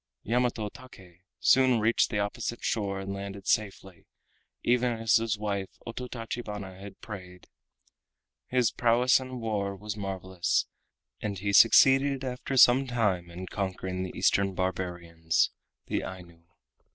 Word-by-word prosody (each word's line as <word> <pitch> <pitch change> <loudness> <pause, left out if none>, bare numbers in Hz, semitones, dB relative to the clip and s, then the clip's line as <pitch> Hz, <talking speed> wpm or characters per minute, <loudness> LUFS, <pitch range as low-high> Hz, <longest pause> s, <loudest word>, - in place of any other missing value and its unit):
Yamato 120 -2 0
Take 95 -7 -14 0.2
soon 130 -3 +4
reached 110 +2 +2
the 105 - -2
opposite 105 +3 -3
shore 100 -3 -1
and 95 0 -5
landed 100 0 -7
safely, 95 -4 -2 0.6
even 125 0 +2
as 115 0 +3
his 115 -1 -1
wife 100 -2 -4
Ototachibana 115 -5 -6
had 100 0 -11
prayed. 90 -4 -10 1.0
His 125 -2 +2
prowess 120 +2 +3
in 130 -1 -7
war 105 -3 -2
was 105 +1 -6
marvelous, 95 -3 -1 0.6
and 100 -2 -3
he 100 +2 -2
succeeded 135 +6 +6
after 130 +1 -3
some 130 +2 +6
time 105 -8 0
in 90 +2 -7
conquering 95 -1 -4
the 95 - -5
Eastern 100 -1 +2
Barbarians, 90 -3 -1 0.3
the - - -1
Ainu. 85 -3 -10
100 Hz, 125 wpm, -28 LUFS, 95-120 Hz, 1.0 s, succeeded